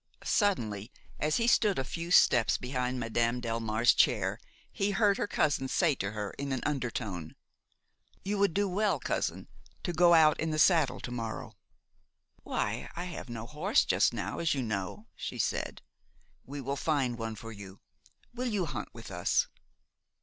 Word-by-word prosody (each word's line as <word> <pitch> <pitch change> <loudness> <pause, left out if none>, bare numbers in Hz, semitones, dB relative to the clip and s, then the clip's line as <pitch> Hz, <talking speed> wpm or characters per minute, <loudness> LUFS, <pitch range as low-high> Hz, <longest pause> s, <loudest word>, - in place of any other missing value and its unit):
Suddenly, 115 - 0 0.3
as 150 +1 +1
he 230 - +1
stood 215 -4 +4
a 135 - 0
few 165 +5 -5
steps 120 -9 +5
behind 125 0 -2
Madame 115 +1 0
Delmare's 115 -1 +2
chair, - - +2 0.3
he 195 - 0
heard 205 0 +3
her - - -1
cousin 145 -7 +1
say 165 +3 +2
to 100 -5 -3
her 105 -2 -4
in 140 0 -3
an 130 - -1
undertone: 110 - -3 0.9
"You 200 +1 -1
would 200 -3 +2
do 205 0 +2
well, 195 -3 +1
cousin, - - -2 0.4
to 175 - -2
go 170 0 +6
out 155 -2 +5
in 160 - -1
the 155 - -1
saddle 155 -5 +4
to 125 - -6
morrow." 115 -2 -5 0.9
"Why, - - -2
I 175 - -3
have 175 -7 -7
no 115 -1 -5
horse 155 - +1
just - - +3
now, 105 -4 -4
as 165 -3 +1
you 135 - -1
know," 100 -1 -4
she - - -5
said. - - -2 0.6
"We 140 +1 -6
will 140 +2 -2
find 140 -5 0
one 115 -1 -4
for 115 +2 -9
you. 100 -2 -10 0.5
Will 250 +1 -3
you 205 -6 0
hunt 130 -9 -5
with 115 -3 -10
us?" 90 -1 +1
135 Hz, 170 wpm, -30 LUFS, 115-170 Hz, 0.9 s, go